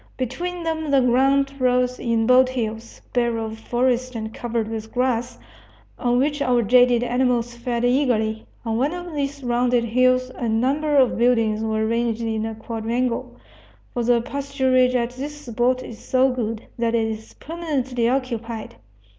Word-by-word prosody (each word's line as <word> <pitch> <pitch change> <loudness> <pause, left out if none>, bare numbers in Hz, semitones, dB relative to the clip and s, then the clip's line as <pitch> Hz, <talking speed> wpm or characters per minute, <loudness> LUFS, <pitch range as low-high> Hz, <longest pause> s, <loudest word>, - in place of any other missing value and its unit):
Between 345 +8 -3
them 320 -2 -2
the 280 -1 +4
ground 270 +3 +3
rose 250 0 +1
in 230 -2 +1
bold 255 +1 +5
hills, 225 -2 -5
bare 235 -2 +1
of 220 0 -5
forest 250 +2 0
and 220 0 -5
covered 235 -2 -2
with 220 0 -6
grass, 245 -1 -1 0.6
on 245 0 +1
which 290 +3 0
our 245 -3 +2
jaded 245 +1 +4
animals 245 -1 0
fed 240 0 -2
eagerly. 235 -4 +1 0.2
On 225 -1 -1
one 285 +8 0
of 350 -1 -7
these 280 -1 -3
rounded 245 0 +2
hills 255 +2 +2
a 235 - -3
number 275 +7 +1
of 260 -4 +3
buildings 230 -3 +2
were 220 0 0
ranged 230 0 0
in 220 -1 -1
a 225 - -5
quadrangle, 230 +2 -2 0.6
for 240 - -1
the 235 0 +3
pasturage 260 -1 +1
at 240 -1 0
this 285 +4 -7
spot 245 +2 0
is 225 - -9
so 260 0 +2
good 230 -3 -3
that 230 0 +1
it 225 -1 +1
is 220 0 -7
permanently 270 -8 -2
occupied. 235 -4 -3
245 Hz, 160 wpm, -22 LUFS, 230-260 Hz, 0.6 s, bold